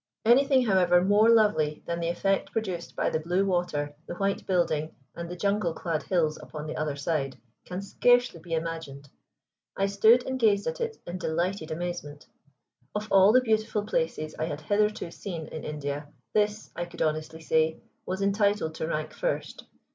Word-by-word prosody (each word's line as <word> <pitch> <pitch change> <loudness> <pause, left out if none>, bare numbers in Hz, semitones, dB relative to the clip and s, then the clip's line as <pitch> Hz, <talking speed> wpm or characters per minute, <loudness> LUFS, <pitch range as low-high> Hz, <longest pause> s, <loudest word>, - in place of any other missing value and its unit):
Anything, 260 +2 +5
however, 180 -4 +4
more 205 +3 +5
lovely 210 -10 +3
than 170 0 -2
the 170 - -1
effect 195 +3 0
produced 185 -7 -3
by - - 0
the 160 - 0
blue 175 +5 +1
water, 155 -6 -1
the 175 - -5
white 195 +2 -1
building, 160 -4 0 0.2
and 170 0 -6
the 180 - -5
jungle 200 -2 0
clad 165 -3 -2
hills 160 -5 0
upon 150 -1 -7
the 155 - -5
other 150 -2 -2
side, 140 -2 -2 0.3
can 180 +2 -5
scarcely 245 -1 +3
be 165 0 -3
imagined. 160 -4 -5 0.7
I 195 - +2
stood 220 +5 +5
and 260 0 -3
gazed 205 -4 +3
at - - -3
it 460 -1 -2
in 175 +1 -5
delighted 170 +1 -1
amazement. 160 -3 -5 0.7
Of 210 +1 -3
all 195 +1 +7
the 255 +3 +6
beautiful 220 -3 0
places 210 - -2
I 155 - 0
had 150 -2 -5
hitherto 205 +1 0
seen 170 -5 -6
in 155 0 -7
India 145 -1 -4 0.3
this, 210 0 0
I 175 - -2
could 170 0 -4
honestly 155 +1 -2
say, 160 0 +1 0.2
was 190 +2 -3
entitled 200 -4 +1
to 160 - -3
rank 155 -1 -3
first. - - -3
175 Hz, 175 wpm, -27 LUFS, 160-205 Hz, 0.7 s, all